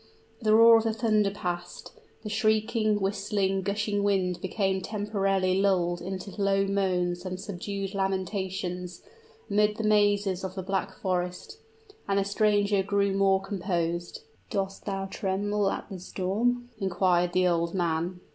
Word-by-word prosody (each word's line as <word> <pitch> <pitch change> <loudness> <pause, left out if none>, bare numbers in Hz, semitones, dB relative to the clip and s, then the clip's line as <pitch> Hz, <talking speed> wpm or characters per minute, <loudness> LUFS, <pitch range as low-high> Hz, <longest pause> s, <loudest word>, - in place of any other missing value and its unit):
The 215 -1 +4
roar 230 0 +8
of 225 - -1
the 225 - +1
thunder 215 -2 +2
past 180 -3 -5 0.3
the 210 - -5
shrieking, 215 0 +1
whistling, 195 -1 0
gushing 205 +1 -1
wind 190 -3 0
became 190 0 0
temporarily 195 -2 0
lulled 175 -3 +1
into 190 +2 -6
low 195 0 +2
moans 180 -3 0
and 185 -1 -5
subdued 195 0 -5
lamentations, 190 -2 -3 0.4
amid 210 +1 +2
the 225 - -3
mazes 205 -3 +2
of 190 0 -5
the 190 - -4
Black 190 0 -2
Forest; 180 - -3 0.5
and 195 0 +1
the 195 - +2
stranger 205 -1 +2
grew 200 0 +1
more 195 -1 +3
composed. 175 -3 -3 0.3
"Dost 195 0 -3
thou 195 -1 -2
tremble 200 +1 -1
at - - -4
the 195 -3 -7
storm?" 230 +7 -1
inquired 180 -2 +1
the 185 0 +3
old 170 0 0
man. 175 0 -1
195 Hz, 140 wpm, -27 LUFS, 185-205 Hz, 0.5 s, roar